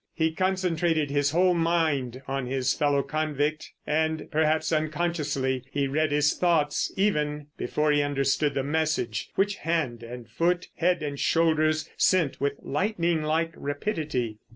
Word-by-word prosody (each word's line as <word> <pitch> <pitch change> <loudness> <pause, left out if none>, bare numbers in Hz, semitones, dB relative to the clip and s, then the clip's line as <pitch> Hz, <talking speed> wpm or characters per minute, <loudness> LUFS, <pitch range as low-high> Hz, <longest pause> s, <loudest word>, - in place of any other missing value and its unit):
He 160 0 +1
concentrated 170 -4 0
his 145 0 +2
whole 180 +4 +3
mind 155 -7 0
on 135 -2 -2
his 130 0 0
fellow 145 -2 +1
convict, 155 +1 -2
and, 155 0 -1
perhaps 160 +1 +1
unconsciously, 150 -5 -1
he 140 -1 0
read 155 +2 0
his 150 0 +3
thoughts 160 -5 +1
even 150 -7 0
before 150 0 0
he 145 0 +3
understood 145 +1 0
the 135 - 0
message 145 -7 -1
which 205 +1 +1
hand 150 -8 -1
and 120 0 -9
foot, 175 +1 0
head 175 -1 +1
and 145 -2 -4
shoulders 155 -1 +2
sent 170 -9 +2
with 140 0 +1
lightning 170 0 0
like 160 +2 0
rapidity. 145 - -3
155 Hz, 140 wpm, -26 LUFS, 140-165 Hz, -, whole